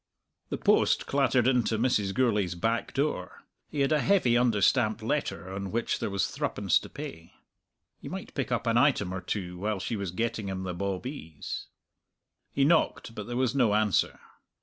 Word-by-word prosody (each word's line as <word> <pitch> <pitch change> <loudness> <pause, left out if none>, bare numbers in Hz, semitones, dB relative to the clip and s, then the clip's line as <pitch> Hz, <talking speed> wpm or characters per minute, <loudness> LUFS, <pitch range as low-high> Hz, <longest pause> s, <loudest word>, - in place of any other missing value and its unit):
The - - -2
post - - +3
clattered 135 -3 +2
in 125 -2 +4
to 110 - 0
Mrs. 105 -4 +1
Gourlay's 105 -8 +1
back 115 +6 -1
door. 135 -10 -2 0.3
He 145 - -2
had 135 - +2
a 155 - +4
heavy 180 -12 +3
under 120 -3 +3
stamped 110 +1 +2
letter 95 +2 -2
on 100 0 -4
which 115 +4 -1
there - - -2
was 100 -1 0
threepence - - +1
to - - -11
pay. 80 +1 -8 0.7
He - - -8
might - - -7
pick - - -3
up - - 0
an - - +3
item 90 - +2
or 90 - -4
two 90 -1 -4
while 105 0 -1
she 105 +5 -3
was 100 -3 -3
getting 110 +2 -2
him 95 -1 -4
the 90 -1 -3
bawbees. 95 - -5 0.8
He 135 - +2
knocked, 155 -6 +2
but 105 -3 -6
there 120 0 -3
was 130 -1 +1
no 120 -7 +3
answer. 105 -3 +1
110 Hz, 185 wpm, -28 LUFS, 95-125 Hz, 0.8 s, in